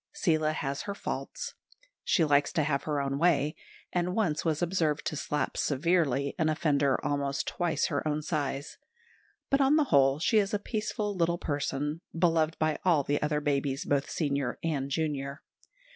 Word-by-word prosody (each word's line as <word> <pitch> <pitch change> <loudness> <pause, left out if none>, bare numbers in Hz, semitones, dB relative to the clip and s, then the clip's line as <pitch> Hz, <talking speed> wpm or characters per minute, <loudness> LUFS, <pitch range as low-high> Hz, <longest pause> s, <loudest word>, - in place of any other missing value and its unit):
Seela 155 - +1
has 140 -2 -3
her 200 - -2
faults. - - -5 0.5
She 165 - +3
likes 145 -1 +3
to 155 - +2
have 140 -2 -1
her 150 -2 0
own 140 0 -1
way, 155 -3 +2 0.4
and 180 +1 0
once 170 -9 +1
was 160 0 0
observed 165 -4 0
to - - -2
slap 145 -1 -2
severely 140 -2 +1
an 155 -1 +2
offender 145 -3 +2
almost 140 -1 -1
twice 175 -2 0
her 145 0 -1
own 150 0 -1
size; 145 -3 -3 0.7
but 275 0 +4
on 275 +2 +5
the 310 - +4
whole 135 0 +5
she 215 +7 +3
is 200 0 0
a - - +3
peaceful 210 -1 -3
little 170 -1 +1
person, 145 +1 -2 0.2
beloved 165 -2 +2
by 155 -1 0
all 170 -6 +3
the 145 +2 0
other 150 0 0
babies, 140 -1 -1
both 140 -1 0
senior 140 -5 -1
and 145 -4 -1
junior. 140 -1 -2
150 Hz, 170 wpm, -29 LUFS, 140-170 Hz, 0.7 s, on